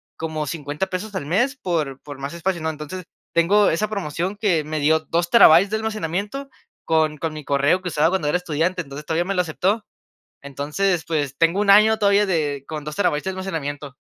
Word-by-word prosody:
como 155 -2 -4
50 150 +3 -3
pesos 200 +4 -5
al 190 -7 -4
mes 240 - +1
por 155 - -2
por 145 -2 -10
más 140 +2 -5
espacio, 170 0 -2
¿no? 160 - -1
Entonces 160 +4 -6 0.3
tengo 195 +5 +4
esa 210 +6 0
promoción 190 -1 -3
que 180 -8 +1
me 155 +1 -3
dio 155 +2 +3
2 170 +3 -1
terabytes 185 -3 +7
de - - +1
almacenamiento 215 - -3 0.4
con 155 -1 +1
con 160 +1 -3
mi 155 -1 -7
correo 140 +7 +2
que 180 - -4
usaba 155 +1 +2
cuando 180 -6 0
era 180 - +2
estudiante, 180 +2 -1
entonces 140 0 -9
todavía 165 +2 0
me 195 - -1
lo 180 - +3
aceptó. 190 +6 -1 0.6
Entonces, 150 +6 -1
pues 145 -5 -2
tengo 165 +4 +2
un 205 -1 +4
año 215 +2 +6
todavía 205 -1 +3
de 145 -6 -1
con 155 -1 -5
2 150 0 -6
terabytes 150 -7 +1
de - - -1
almacenamiento. 150 -7 -5
165 Hz, 200 wpm, -22 LUFS, 150-195 Hz, 0.6 s, terabytes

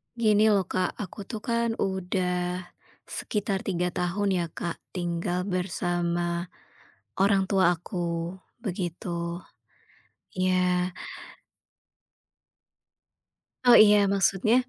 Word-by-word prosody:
Gini 215 -2 +4
loh, 205 -3 +4
Kak, 185 0 -1
aku 200 +1 -8
tuh 220 -1 -6
kan 235 -1 0
udah, 180 -2 -1 0.4
sekitar 200 -2 -3
3 180 -2 0
tahun 180 +4 -1
ya, - - +1
Kak, 170 +1 -5 0.2
tinggal 175 0 -1
bersama 175 -2 -1 0.7
orang 195 0 +4
tua 185 -3 +4
aku, 170 -1 -3 0.3
begitu, 180 -4 -4 1.3
iya. 180 -1 +2 2.7
Oh 245 - +7
iya, 210 -1 +8 0.2
maksudnya, 195 +3 +3
185 Hz, 90 wpm, -27 LUFS, 175-200 Hz, 2.7 s, iya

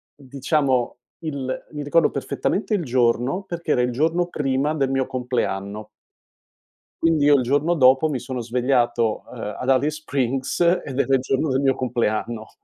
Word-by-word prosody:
diciamo 135 -2 -1 0.3
il 140 -4 -4
mi 150 -1 -5
ricordo 150 +3 +3
perfettamente 195 - -2
il 185 - -1
giorno, 125 +7 +1
perché 170 -4 -4
era 125 - +3
il 125 0 0
giorno 165 +7 +1
prima 145 -2 -1
del 135 -4 0
mio 135 -1 0
compleanno. 105 -5 -3 1.2
Quindi 165 -3 +3
io 145 0 +6
il 130 - +2
giorno 145 +7 +1
dopo 130 +1 +5
mi 135 -4 -2
sono 125 +1 -5
svegliato, 120 -1 0
ehm, 105 -4 -6
ad 130 - -3
Alice 145 +4 +1
Springs, 135 -3 -2
ed 170 -6 +1
era 135 - +2
il 130 - +1
giorno 135 +4 0
del 135 0 +1
mio 135 -1 +3
compleanno. 115 -2 -2
135 Hz, 160 wpm, -22 LUFS, 125-150 Hz, 1.2 s, io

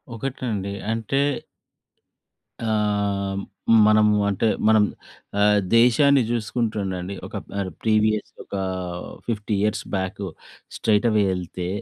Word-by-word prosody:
ఒకటండి 115 -6 -3 0.2
అంటే 115 +5 0 1.4
ఆహ్, 100 -2 0 0.5
మనము 105 -1 +5
అంటే 100 +3 +1 0.2
మనం 110 -1 +6 0.6
ఆహ్, 105 0 +5 0.2
దేశాన్ని 135 +3 +5
చూసుకుంటు 115 0 -1
ఉండండి. 95 +1 -4
ఒక - - -10
పర్ 100 -2 -3
ప్రీవియస్ 110 -1 +2
ఒకా 100 -1 -4 0.7
50 105 -2 -1
ఇయర్స్ 105 0 0
బ్యాకు. 95 +1 -3 0.5
స్ట్రెయిట్ 105 +1 +2
అవే 105 -2 +3
యేళ్తే, 90 -1 -4
105 Hz, 100 wpm, -23 LUFS, 100-110 Hz, 1.4 s, మనం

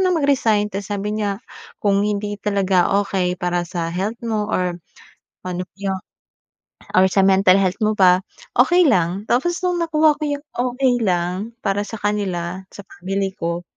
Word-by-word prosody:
ng 360 - +2
mag-resign. 225 -8 +2
Tapos 195 0 -4
sabi 205 +1 -2
niya, 205 -2 -2 0.4
kung 200 -1 +2
hindi 205 0 -1
talaga 195 -2 +2
okey 180 -2 -1
para 175 -1 0
sa 170 -2 -3
health 200 +5 -2
mo 215 -2 -1
or 180 -1 0 0.7
ano 180 0 -3 1.4
or 190 - +6
sa 190 +1 +2
mental 190 -1 +5
health 190 -1 +1
mo 215 0 +2
pa, 185 -2 +5 0.4
okey 350 +8 +5
lang. 180 -2 +1
Tapos 340 +9 +2
no'ng 360 -1 +1
nakuha 310 -2 +3
ko - - -11
'yong 285 0 -3
okey 250 +1 +1
lang, 185 +2 -1
para 200 -1 +1
sa 225 - -6
kanila, 190 -4 -2
sa 200 - -9 0.2
family 195 +1 -2
ko. 170 +1 -2
200 Hz, 155 wpm, -20 LUFS, 185-225 Hz, 1.4 s, or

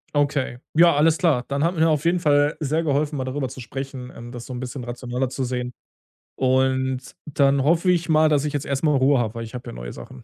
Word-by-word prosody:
Okay. 140 -4 0 0.2
Ja, 170 0 +6
alles 155 +2 +4
klar. 150 -9 +2
Dann 140 +1 -1
hat 170 +2 +2
mir 165 0 +3
auf 150 -1 0
jeden 175 +1 +3
Fall 145 -2 +3
sehr 155 +2 0
geholfen, 150 0 0
mal 130 - -2
darüber 130 0 -3
zu 130 - -10
sprechen, 130 +1 -7
ähm, 120 +1 -9
das 120 -1 -8
so 130 - -7
'n 125 - -5
bisschen 130 0 -6
rationeller 125 +1 -3
zu 135 +1 -3
sehen, 125 0 -3 0.6
und 130 0 0
dann 140 -2 +2
hoffe 165 +5 +2
ich 175 -1 0
mal, 155 -1 +4
dass 150 -1 +2
ich 150 - -2
jetzt 145 - -3
erstmal 145 +2 +1
Ruhe 135 +1 +4
habe, 115 -3 -1
weil 115 -1 -5
ich 110 - -10
habe 125 - -7
ja - - -8
neue - - -7
Sachen. 65 - -11
135 Hz, 240 wpm, -23 LUFS, 125-150 Hz, 0.6 s, Ja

